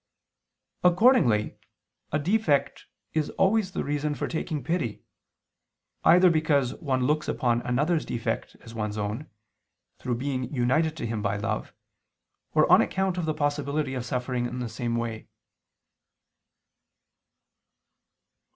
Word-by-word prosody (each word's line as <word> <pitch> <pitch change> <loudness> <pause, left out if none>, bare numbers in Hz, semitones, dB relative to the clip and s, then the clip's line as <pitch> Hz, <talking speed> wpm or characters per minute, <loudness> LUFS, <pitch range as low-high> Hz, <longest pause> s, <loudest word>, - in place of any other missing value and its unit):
Accordingly 180 - +4 0.5
a 150 - +2
defect 160 -2 +1 0.3
is 155 -2 0
always 195 0 +2
the - - -2
reason 145 +1 -1
for - - -3
taking 160 -3 -3
pity, 145 - -2 1.0
either 180 +1 +6
because 150 -5 +2
one 130 -5 0
looks 150 +3 +1
upon 120 -1 +1
another's 150 +8 +1
defect 115 - -3
as 115 - -12
one's 105 -2 -3
own, 105 +8 -4 0.7
through 125 -1 -2
being 130 0 -3
united 155 +5 +1
to 120 - -4
him 115 -2 -3
by 100 -1 -1
love, 100 - -3 0.8
or - - +6
on - - +8
account 190 -1 -1
of 170 - -1
the 155 - 0
possibility 145 -1 -1
of 125 -2 -3
suffering 125 -1 -2
in 125 - -6
the 125 -2 -3
same 115 +1 -3
way. 115 -1 -4
140 Hz, 125 wpm, -26 LUFS, 120-160 Hz, 1.0 s, on